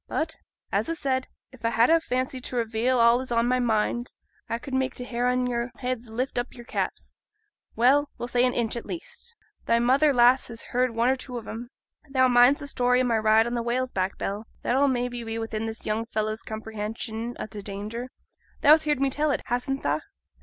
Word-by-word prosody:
But, 320 Hz, +1 st, -2 dB, 0.4 s
as -, -, 0 dB
a 330 Hz, -, 0 dB
said, 260 Hz, -4 st, -1 dB, 0.2 s
if 260 Hz, -3 st, -16 dB
a 230 Hz, -, +2 dB
had 230 Hz, +4 st, +4 dB
a 330 Hz, -, +6 dB
fancy 255 Hz, -3 st, -2 dB
to 255 Hz, -, -6 dB
reveal 235 Hz, +2 st, +1 dB
all 235 Hz, +1 st, +5 dB
as 260 Hz, -, -6 dB
is -, -, -6 dB
on 235 Hz, 0 st, +2 dB
my 255 Hz, +1 st, +2 dB
mind 240 Hz, +1 st, 0 dB, 0.3 s
a 230 Hz, -, -1 dB
could 270 Hz, +2 st, -9 dB
make 260 Hz, 0 st, 0 dB
t' 250 Hz, -, -5 dB
hair 245 Hz, 0 st, -1 dB
on 250 Hz, 0 st, +1 dB
your 240 Hz, 0 st, -1 dB
heads 250 Hz, -2 st, -3 dB
lift 245 Hz, +3 st, -2 dB
up 245 Hz, -, -2 dB
your 240 Hz, -1 st, -11 dB
caps -, -, -3 dB, 0.6 s
well, 280 Hz, +5 st, +4 dB
we'll 240 Hz, -, -4 dB
say 245 Hz, 0 st, +2 dB
an 250 Hz, -1 st, +2 dB
inch, 235 Hz, -1 st, 0 dB
at 235 Hz, -, -6 dB
least. 475 Hz, +5 st, -8 dB, 0.3 s
Thy 230 Hz, -, +4 dB
mother, 265 Hz, +6 st, +4 dB
lass, 250 Hz, 0 st, +5 dB
has 230 Hz, -1 st, -6 dB
heerd 250 Hz, -1 st, +1 dB
one 235 Hz, +2 st, +3 dB
or 265 Hz, -, +3 dB
two 255 Hz, -1 st, -7 dB
on 230 Hz, -, -8 dB
'em. 235 Hz, +2 st, -6 dB, 0.4 s
Thou 260 Hz, -1 st, +4 dB
minds 245 Hz, +3 st, +5 dB
the 285 Hz, -, -6 dB
story 250 Hz, -2 st, +2 dB
o' -, -, +3 dB
my 235 Hz, -3 st, +2 dB
ride 220 Hz, +1 st, +4 dB
on 240 Hz, +1 st, -2 dB
a 235 Hz, -, 0 dB
whale's 250 Hz, +2 st, -1 dB
back, 185 Hz, +1 st, -1 dB
Bell? 205 Hz, +3 st, -4 dB, 0.2 s
That'll 270 Hz, +4 st, +3 dB
maybe 245 Hz, -2 st, -1 dB
be 225 Hz, 0 st, -4 dB
within 225 Hz, -1 st, -3 dB
this 225 Hz, 0 st, -6 dB
young 220 Hz, +2 st, -1 dB
fellow's 215 Hz, -1 st, -2 dB
comprehension 220 Hz, +2 st, -5 dB
o' -, -, -3 dB
t' 215 Hz, -1 st, -8 dB
danger; 210 Hz, +5 st, -5 dB, 0.5 s
thou's 305 Hz, +1 st, +7 dB
heerd 295 Hz, -3 st, +1 dB
me 275 Hz, -1 st, +2 dB
tell 300 Hz, +3 st, 0 dB
it, 285 Hz, -, 0 dB
hastn't 250 Hz, +3 st, -1 dB
ta?' 145 Hz, +2 st, +1 dB
245 Hz, 225 wpm, -26 LUFS, 225-260 Hz, 0.6 s, thou's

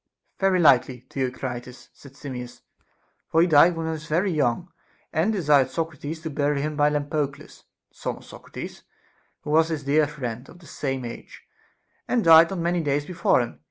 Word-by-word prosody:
Very 190 Hz, -1 st, +2 dB
likely, 130 Hz, -5 st, +3 dB
Theocritus, 125 Hz, -1 st, -5 dB
said 140 Hz, -2 st, -16 dB
Simmias; 125 Hz, -4 st, -8 dB, 0.7 s
for 160 Hz, -, +2 dB
he 170 Hz, -, +6 dB
died 170 Hz, +1 st, +5 dB
when 165 Hz, 0 st, -4 dB
he 160 Hz, -, -2 dB
was 155 Hz, -1 st, -6 dB
very 180 Hz, +5 st, +1 dB
young, 155 Hz, +3 st, 0 dB, 0.4 s
and 170 Hz, +7 st, +1 dB
desired 150 Hz, -9 st, +3 dB
Socrates 160 Hz, +1 st, -5 dB
to 160 Hz, -2 st, -5 dB
bury 145 Hz, 0 st, 0 dB
him 150 Hz, +1 st, -3 dB
by 145 Hz, 0 st, +3 dB
Lampo 150 Hz, 0 st, -1 dB
cles. 140 Hz, +2 st, -16 dB, 0.3 s
the -, -, -34 dB
son -, -, -4 dB
of -, -, -16 dB
Socrates, -, -, -9 dB, 0.6 s
who 150 Hz, -, -6 dB
was 160 Hz, +1 st, +4 dB
his 155 Hz, -3 st, -3 dB
dear 145 Hz, +2 st, +2 dB
friend, 125 Hz, -4 st, -6 dB
of 170 Hz, -, -14 dB
the 175 Hz, -, -18 dB
same 135 Hz, -4 st, -4 dB
age, 120 Hz, -, -10 dB, 0.6 s
and 240 Hz, -3 st, +1 dB
died 165 Hz, 0 st, +8 dB
not 195 Hz, -, -4 dB
many 170 Hz, +1 st, 0 dB
days 145 Hz, -1 st, -1 dB
before 170 Hz, -6 st, +2 dB
him. 120 Hz, -, -6 dB
150 Hz, 185 wpm, -24 LUFS, 135-165 Hz, 0.7 s, died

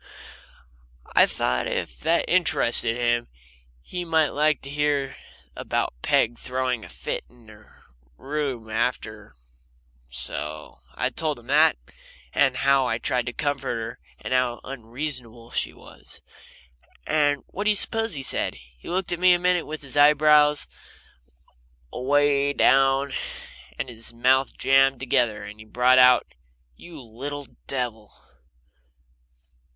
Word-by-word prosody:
I -, -, +6 dB
thought 60 Hz, 0 st, -1 dB
if 60 Hz, -, -4 dB
that 170 Hz, +1 st, +1 dB
interested 120 Hz, -9 st, +4 dB
him 120 Hz, -1 st, 0 dB, 0.6 s
he 180 Hz, -, -5 dB
might 160 Hz, -3 st, +2 dB
like 150 Hz, 0 st, +1 dB
to 135 Hz, -, -6 dB
hear 145 Hz, -2 st, -1 dB, 0.4 s
about -, -, -2 dB
Peg 120 Hz, +1 st, +1 dB
throwing 125 Hz, -2 st, -2 dB
a -, -, -11 dB
fit -, -, -5 dB
in 120 Hz, -2 st, -22 dB
her 105 Hz, -1 st, -19 dB, 0.3 s
room 135 Hz, -6 st, -4 dB
after, 110 Hz, -2 st, -3 dB, 0.7 s
so 75 Hz, +5 st, -4 dB, 0.2 s
I -, -, -1 dB
told 155 Hz, -3 st, -2 dB
him 120 Hz, -, -16 dB
that, 155 Hz, -, +5 dB, 0.6 s
and 135 Hz, -3 st, +2 dB
how 135 Hz, -1 st, +3 dB
I 115 Hz, -, 0 dB
tried 125 Hz, +1 st, -1 dB
to 125 Hz, -, -3 dB
comfort 145 Hz, 0 st, -2 dB
her, 115 Hz, +1 st, -6 dB, 0.2 s
and -, -, -4 dB
how 125 Hz, -2 st, +1 dB
unreasonable 120 Hz, -2 st, -6 dB
she -, -, -2 dB
was. -, -, -15 dB, 0.8 s
And 145 Hz, -2 st, +1 dB
what 205 Hz, +3 st, -6 dB
do -, -, +3 dB
you 210 Hz, -, +3 dB
suppose 225 Hz, +1 st, +1 dB
he 135 Hz, -, -5 dB
said? -, -, -1 dB
He 60 Hz, 0 st, -15 dB
looked 180 Hz, +1 st, -2 dB
at 175 Hz, -, -2 dB
me 180 Hz, 0 st, +6 dB
a -, -, +3 dB
minute 180 Hz, -1 st, +1 dB
with 155 Hz, 0 st, -7 dB
his 135 Hz, -1 st, -6 dB
eyebrows 150 Hz, 0 st, +5 dB, 1.3 s
away 140 Hz, +2 st, +2 dB
down, 135 Hz, 0 st, +3 dB, 0.6 s
and -, -, -3 dB
his 115 Hz, -1 st, -5 dB
mouth 130 Hz, +2 st, +2 dB
jammed 135 Hz, -1 st, +3 dB
together, 120 Hz, -4 st, 0 dB
and -, -, -7 dB
then 105 Hz, -, -17 dB
he 110 Hz, -, -12 dB
brought 125 Hz, +3 st, +3 dB
out: 125 Hz, -1 st, +6 dB, 0.5 s
"You 165 Hz, -, -12 dB
little 140 Hz, +6 st, -7 dB, 0.2 s
devil!" 120 Hz, -5 st, -4 dB
135 Hz, 135 wpm, -24 LUFS, 120-150 Hz, 1.3 s, I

